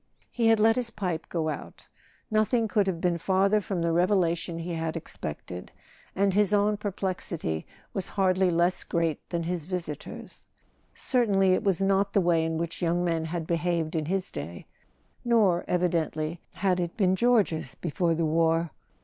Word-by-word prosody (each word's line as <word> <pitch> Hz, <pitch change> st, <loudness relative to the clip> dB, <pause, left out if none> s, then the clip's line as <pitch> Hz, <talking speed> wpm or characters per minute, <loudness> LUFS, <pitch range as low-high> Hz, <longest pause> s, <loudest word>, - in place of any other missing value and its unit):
He 235 Hz, -2 st, +1 dB
had 225 Hz, -1 st, +5 dB
let 225 Hz, +2 st, +4 dB
his 245 Hz, -2 st, 0 dB
pipe 180 Hz, -7 st, -4 dB
go 165 Hz, -2 st, -1 dB
out. 155 Hz, -, -7 dB, 0.4 s
Nothing 220 Hz, +2 st, +2 dB
could 205 Hz, -2 st, +1 dB
have 180 Hz, -3 st, -1 dB
been 170 Hz, -1 st, 0 dB
farther 195 Hz, +4 st, +2 dB
from 185 Hz, -3 st, -2 dB
the 170 Hz, -, +1 dB
reve¬ 175 Hz, +2 st, +3 dB
lation 170 Hz, -1 st, -1 dB
he 170 Hz, +1 st, -4 dB
had 165 Hz, 0 st, -2 dB
expected, 90 Hz, -, -7 dB, 0.4 s
and 195 Hz, 0 st, +2 dB
his 205 Hz, +1 st, +3 dB
own 205 Hz, +1 st, +3 dB
perplexity 185 Hz, -, -3 dB, 0.3 s
was 195 Hz, -, -3 dB
hardly 190 Hz, -1 st, +3 dB
less 175 Hz, +1 st, +2 dB
great 165 Hz, -3 st, 0 dB
than 170 Hz, -1 st, -2 dB
his 170 Hz, -2 st, -3 dB
visitor's. 170 Hz, -6 st, -6 dB, 0.5 s
Certainly 200 Hz, -7 st, +3 dB
it -, -, +1 dB
was 195 Hz, -2 st, +1 dB
not 195 Hz, +1 st, +2 dB
the -, -, +4 dB
way 170 Hz, -3 st, +3 dB
in 160 Hz, 0 st, -1 dB
which 165 Hz, 0 st, -4 dB
young 175 Hz, +1 st, +1 dB
men 165 Hz, -2 st, 0 dB
had 165 Hz, 0 st, -3 dB
behaved 170 Hz, -1 st, -1 dB
in 155 Hz, -2 st, -1 dB
his 185 Hz, +1 st, -1 dB
day—nor, 175 Hz, -, -2 dB
evidently, 170 Hz, -2 st, 0 dB
had 185 Hz, -2 st, +1 dB
it 175 Hz, -1 st, -3 dB
been 190 Hz, -3 st, +3 dB
George's 190 Hz, -, +2 dB
before 170 Hz, +1 st, 0 dB
the 165 Hz, 0 st, 0 dB
war. 165 Hz, +1 st, +2 dB
175 Hz, 165 wpm, -27 LUFS, 165-195 Hz, 0.5 s, had